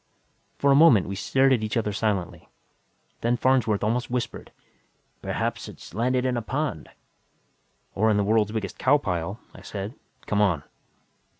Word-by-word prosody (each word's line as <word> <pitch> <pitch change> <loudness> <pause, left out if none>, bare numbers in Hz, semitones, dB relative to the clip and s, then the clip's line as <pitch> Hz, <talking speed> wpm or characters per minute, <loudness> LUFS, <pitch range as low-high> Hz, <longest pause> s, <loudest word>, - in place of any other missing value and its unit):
For 140 - +3
a - - +6
moment, 140 - +6
we 100 - -4
stared 130 +7 +2
at 120 - +1
each 110 +2 -2
other 105 -2 -1
silently. 100 -4 -2 0.7
Then 120 +1 +1
Farnsworth 120 -6 +2
almost 120 +3 0
whispered, 125 0 -4 0.7
"Perhaps - - -3
it's - - -12
landed 125 +4 0
in 125 -1 0
a - - -1
pond." 135 - -3 1.0
"Or 110 +3 +2
in 105 - +3
the 100 - +2
world's 105 0 +2
biggest 110 -4 -4
cow 140 +3 +4
pile," 95 - -3
I - - -13
said. 100 +2 -6 0.3
"Come 105 0 +1
on!" 90 -8 +2
110 Hz, 160 wpm, -25 LUFS, 100-125 Hz, 1.0 s, a